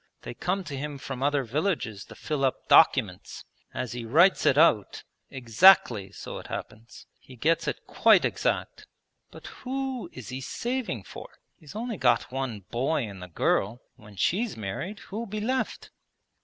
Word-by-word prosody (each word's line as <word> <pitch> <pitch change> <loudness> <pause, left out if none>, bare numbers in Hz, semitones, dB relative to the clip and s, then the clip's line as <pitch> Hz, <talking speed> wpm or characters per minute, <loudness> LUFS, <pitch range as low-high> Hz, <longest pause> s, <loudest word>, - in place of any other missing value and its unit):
They - - -6
come 185 +9 -2
to 150 -5 -6
him 145 +1 -5
from 135 -1 -7
other 145 0 +1
villages 130 - -2
to - - -13
fill 150 -3 -3
up 130 - -1
documents. - - +3 0.3
As 125 -2 -4
he 120 -1 -5
writes 165 +12 +4
it 140 - +4
out, 150 -10 +3 0.3
exactly 120 - +4
so - - -8
it - - -11
happens. 110 +2 -8
He 130 - -15
gets 160 +7 +1
it - - -4
quite - - +4
exact. - - -2 0.4
But - - -13 0.2
who 265 -1 -4
is 130 -5 -10
he 130 +1 -5
saving 240 - -3
for? - - -10 0.3
He's 155 +4 -13
only 230 -1 -4
got 120 -5 +2
one 130 -5 -4
boy 135 +4 0
and 100 -4 -8
the 90 - -8
girl; 100 +6 0 0.2
when 105 -1 -16
she's 195 - 0
married 110 - -5
who'll 225 +4 -6
be 210 +2 -4
left?' 255 +5 -2
135 Hz, 165 wpm, -27 LUFS, 115-195 Hz, 0.4 s, writes